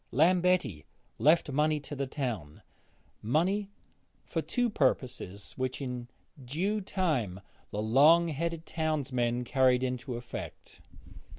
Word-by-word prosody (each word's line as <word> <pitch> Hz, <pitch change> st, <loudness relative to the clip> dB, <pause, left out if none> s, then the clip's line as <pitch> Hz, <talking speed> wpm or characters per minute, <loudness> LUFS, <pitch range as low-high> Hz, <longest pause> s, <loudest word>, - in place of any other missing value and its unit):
Lambetti 175 Hz, -, +3 dB, 0.4 s
left 155 Hz, -1 st, +4 dB
money 150 Hz, +2 st, +2 dB
to 145 Hz, +1 st, -7 dB
the 140 Hz, 0 st, -2 dB
town, 115 Hz, -, -4 dB, 0.6 s
money 185 Hz, -, +1 dB, 0.6 s
for -, -, -2 dB
two 245 Hz, -1 st, 0 dB
purposes 130 Hz, -, -1 dB
which 130 Hz, -1 st, -2 dB
in 125 Hz, -3 st, -5 dB, 0.4 s
due 185 Hz, -, -1 dB
time 150 Hz, -, -1 dB, 0.3 s
the 105 Hz, +1 st, -3 dB
long 150 Hz, +9 st, +6 dB
headed 165 Hz, +2 st, -3 dB
townsmen 130 Hz, -7 st, -1 dB
carried 130 Hz, -1 st, +3 dB
into 125 Hz, -1 st, -3 dB
effect. 120 Hz, +1 st, -8 dB
135 Hz, 110 wpm, -30 LUFS, 125-165 Hz, 0.6 s, long